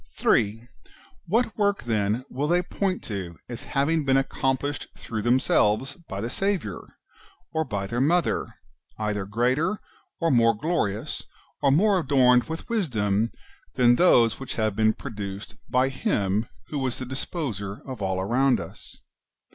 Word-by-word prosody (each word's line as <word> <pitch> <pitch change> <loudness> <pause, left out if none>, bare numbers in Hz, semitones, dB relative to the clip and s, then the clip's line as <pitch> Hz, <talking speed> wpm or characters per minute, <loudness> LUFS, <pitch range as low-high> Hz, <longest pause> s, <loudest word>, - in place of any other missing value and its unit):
3. 110 +3 +2 0.6
What 225 +4 +1
work, 205 -1 +1
then, 110 +1 0
will 140 +3 -2
they 175 +2 +3
point 185 +1 -2
to 95 -5 -5
as 125 +3 -7
having 150 +4 +1
been 135 -1 +3
accomplished 135 +1 -1
through 110 -2 -4
themselves 120 +1 +2
by 110 - -7
the 115 - -2
Saviour, 175 - -3 0.6
or 160 0 +1
by 100 -9 -3
their 120 +5 -2
Mother, 170 +3 +1 0.4
either 105 -2 -2
greater, 125 - +1 0.4
or 165 -1 +2
more 115 -3 +4
glorious, 110 - -1 0.4
or 140 - +4
more 195 +6 +4
adorned 130 -5 +4
with 160 0 -6
wisdom, 115 - 0 0.4
than 120 -1 +5
those 120 -11 +5
which 135 - -5
have 110 -2 0
been 110 0 +3
produced 100 -5 -7
by 130 +1 +3
Him 105 -4 0 0.2
who 150 - -2
was 130 -2 -1
the 130 - -5
disposer 120 - -4
of 130 -5 -7
all 95 -1 0
around 125 +7 +2
us - - -10
125 Hz, 145 wpm, -25 LUFS, 105-150 Hz, 0.6 s, than